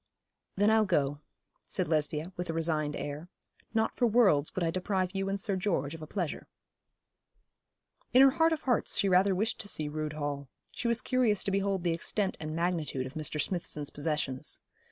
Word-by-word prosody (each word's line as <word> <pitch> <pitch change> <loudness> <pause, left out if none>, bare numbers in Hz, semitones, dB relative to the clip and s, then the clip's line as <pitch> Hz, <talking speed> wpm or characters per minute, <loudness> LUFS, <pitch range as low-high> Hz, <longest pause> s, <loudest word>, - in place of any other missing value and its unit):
'Then 205 +2 +4
I'll 220 -1 +4
go,' 145 -5 +1 0.5
said - - 0
Lesbia, 155 +2 0
with 175 -1 -4
a - - -1
resigned 155 -2 0
air. 145 +4 -5 0.4
'Not 220 0 0
for 245 - +3
worlds 200 -11 +3
would 185 - 0
I 165 - +1
deprive 185 0 -1
you 195 0 -1
and 200 0 -1
Sir 195 0 -1
George 175 -7 -1
of 165 - -8
a 155 - -7
pleasure.' 175 -3 -3 1.6
In 255 +2 +7
her 270 - +7
heart 325 +4 +3
of 315 -2 -1
hearts 245 -4 +1
she 200 - +3
rather 190 +1 +4
wished 215 +5 0
to 205 - -4
see 155 -6 0
Rood 155 0 -3
Hall. 145 -2 -4 0.2
She 240 - -3
was 235 +1 +1
curious 245 -6 +2
to 195 - -1
behold 195 -1 0
the 170 -2 +2
extent 190 +4 -1
and 155 0 -4
magnitude 165 -6 -1
of 130 - -8
Mr. 155 -1 -3
Smithson's 150 -4 -2
possessions. 145 -3 -3
175 Hz, 190 wpm, -30 LUFS, 150-205 Hz, 1.6 s, In